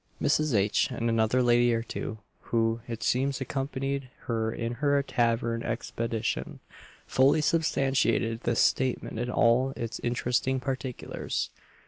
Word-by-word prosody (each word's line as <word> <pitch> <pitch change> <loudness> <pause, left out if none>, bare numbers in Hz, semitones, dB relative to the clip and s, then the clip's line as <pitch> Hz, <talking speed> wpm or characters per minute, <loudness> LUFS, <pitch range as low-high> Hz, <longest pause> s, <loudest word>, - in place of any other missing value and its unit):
Mrs. 155 -5 +2
H., 105 +1 +2
and 120 -2 -2
another 115 +3 +2
lady 120 0 +4
or 115 - -1
two, 110 - -5 0.3
who, 115 0 +1
it 115 -3 -5
seems, 135 +4 +1
accompanied 135 0 -3
her 110 -1 -1
in 115 +1 -3
her 145 -1 +3
tavern 115 -2 0
expedition, 115 -1 -3 0.5
fully 135 +4 +4
substantiated 135 -7 +1
this 120 - +1
statement 130 -3 +1
in 120 +1 -2
all 125 +3 +3
its 115 -1 -4
interesting 125 +2 0
particulars. 130 -1 -3
120 Hz, 125 wpm, -28 LUFS, 115-135 Hz, 0.5 s, lady